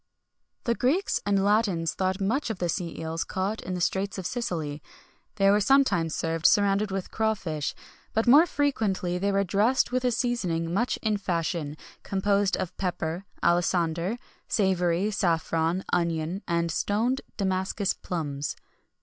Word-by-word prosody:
The 235 - +1
Greeks 280 - +1
and 200 -1 +2
Latins 200 -6 +2
thought 190 0 -1
much 230 +8 0
of 220 - -3
sea 170 -2 -4
eels 160 +1 -2
caught 195 +4 -2
in 185 - -4
the - - -3
straits 190 +3 -1
of 190 - -5
Sicily.[XXI 160 -10 -3 0.5
68] - - -42
They 195 -2 +4
were 205 +1 +3
sometimes 200 - +3
served 165 0 +1
surrounded 205 0 +3
with 195 -1 -4
crawfish;[XXI 190 -9 -1
69] - - -20 0.3
but 225 - +2
more 290 +8 +7
frequently 205 - 0
they 200 +2 +1
were 200 0 +2
dressed 210 +8 +2
with 255 0 0
a 250 - +3
seasoning 185 -9 -1
much 235 +6 +1
in 215 -2 +1
fashion, 165 -5 -2 0.2
composed 200 0 +1
of 180 0 -4
pepper, 175 -1 -3 0.2
alisander, 175 +3 +1 0.3
savory, 185 -1 +1
saffron, 165 -2 0
onion, 170 +2 0
and 170 -1 0
stoned 225 +9 0 0.2
Damascus 190 0 0
plums. 145 -5 -4
190 Hz, 150 wpm, -27 LUFS, 170-210 Hz, 0.5 s, more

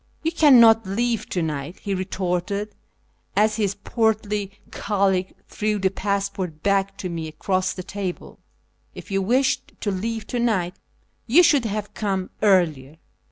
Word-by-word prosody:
" - - -39
You 325 - +1
cannot 235 - +6
leave 230 +3 -1
to 180 - -1
night," 150 +1 -4
he 200 - -2
retorted 190 +2 -2 0.6
as 215 +1 +3
his 200 -3 0
portly 210 -3 -1 0.2
colleague 190 -3 0
threw 215 0 -1
the 190 -1 +1
passport 195 -5 -3
back 195 0 +1
to 195 - -4
me 165 -2 -4
across 185 +4 -1
the 185 - -7
table; 190 -1 -6 0.3
" - - -41
if - - -10
you 195 0 +1
wished 250 +7 +1
to 205 - -1
leave 220 +3 -3
to 245 - -3
night 190 -7 0 0.5
you 305 +10 +6
should 290 -7 +4
have 210 -1 -3
come 195 -3 -2
earlier." 160 -8 +2
200 Hz, 155 wpm, -23 LUFS, 185-220 Hz, 0.6 s, cannot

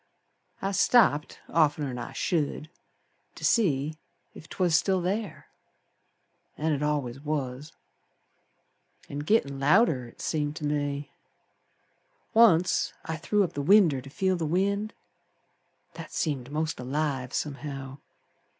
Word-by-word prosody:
I 195 - 0
stopped 190 -6 +3
oftener'n 145 -5 +1
I 120 - -6
should 155 +1 -2 0.6
To - - -5
see 155 - +1 0.4
ef 160 - -12
'twas 180 -3 0
still 185 +2 +2
ther, 200 +3 -3 1.1
An' 160 +1 0
it 145 -2 -1
al'ays 145 -4 -1
was. 145 0 -4 1.4
An' 145 - -5
gittin' 145 -6 +1
louder 145 - +3
It 115 - -17
seemed 150 -1 -2
ter 155 - -5
me. 145 -1 -2 1.2
Once 185 -6 +4
I 160 - -3
threw 205 +6 +1
up 180 - -3
the 145 - -3
winder 165 -5 +5
to 135 - -11
feel 190 +6 0
the 165 -2 -2
wind. 200 +5 0 1.0
That - - -9
seemed 140 -6 -2
most 155 -1 -2
alive 135 0 -2
somehow. 140 -2 -5
150 Hz, 120 wpm, -27 LUFS, 140-180 Hz, 1.4 s, winder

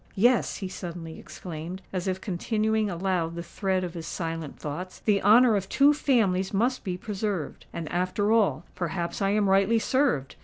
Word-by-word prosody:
"Yes," 240 +5 +3
he 190 - -4
suddenly 170 -3 -7
exclaimed, 175 +2 -7
as 185 0 -2
if 185 0 -1
continuing 215 +3 0
aloud 175 -2 -1
the 170 - -4
thread 190 +1 -1
of 175 -2 -4
his 165 -2 -6
silent 165 -3 -4
thoughts,—"the 185 +6 -2
honour 225 +3 +6
of 195 -1 -2
two 285 +1 +5
families 210 -10 +1
must 240 +6 +1
be 180 -2 -3
preserved! 200 -5 -4
And, 165 -2 -5
after 185 +4 0
all,—perhaps 175 -2 0
I 195 - +2
am 205 0 +2
rightly 195 +4 +4
served! 245 - +1
190 Hz, 160 wpm, -27 LUFS, 175-215 Hz, -, honour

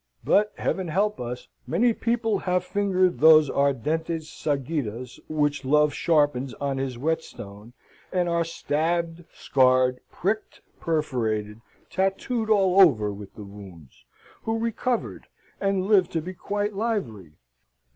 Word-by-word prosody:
But, 210 +1 +3
heaven 190 -2 -2
help 205 +6 0
us! 125 +1 -6 0.2
many 230 +8 +2
people 225 -3 0
have 180 -1 0
fingered 185 -2 +1
those 155 -1 +7
ardentes 155 +4 -1
sagittas 135 -5 -3
which 150 -2 0
Love 150 +2 +3
sharpens 145 -6 +1
on 140 +1 -2
his 130 -2 -3
whetstone, 120 -7 -5 0.4
and 180 -1 +1
are 170 0 +1
stabbed, 165 +1 -2
scarred, 130 -1 +2
pricked, 215 +4 -3 0.2
perforated, 115 -10 -2 0.3
tattooed 205 +4 -1
all 195 -3 +5
over 110 - +4
with 100 -1 -11
the 105 - -9
wounds, 95 -8 -13 0.4
who 225 0 -2
recovered, 230 +2 -2 0.3
and 195 -1 0
live 195 -4 +4
to 165 - -2
be 185 +2 -6
quite 205 +3 -3
lively. 170 - -3
160 Hz, 125 wpm, -25 LUFS, 130-195 Hz, 0.4 s, those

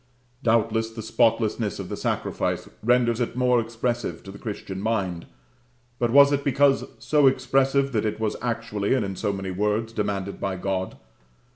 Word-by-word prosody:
Doubtless 115 -2 +2
the 110 -1 -8
spotlessness - - +1
of - - -6
the - - -4
sacrifice - - -2
renders 120 0 +2
it 120 - -2
more 125 -1 +3
expressive 115 -5 -3
to 95 - -9
the 100 - -11
Christian 100 -3 -6
mind; 100 -6 -2 0.7
but 120 - +1
was 140 +3 +7
it 140 -1 0
because 140 0 +3
so 150 -2 +3
expressive 135 +1 +2
that 110 -4 0
it 110 0 -2
was 110 -1 -1
actually, 115 -2 -1
and 120 -6 0
in 95 -1 -4
so 105 +2 -1
many 95 -1 -4
words, 105 +4 -1
demanded 100 -2 -2
by 95 -1 -2
God? 95 0 -3
115 Hz, 165 wpm, -25 LUFS, 100-125 Hz, 0.7 s, was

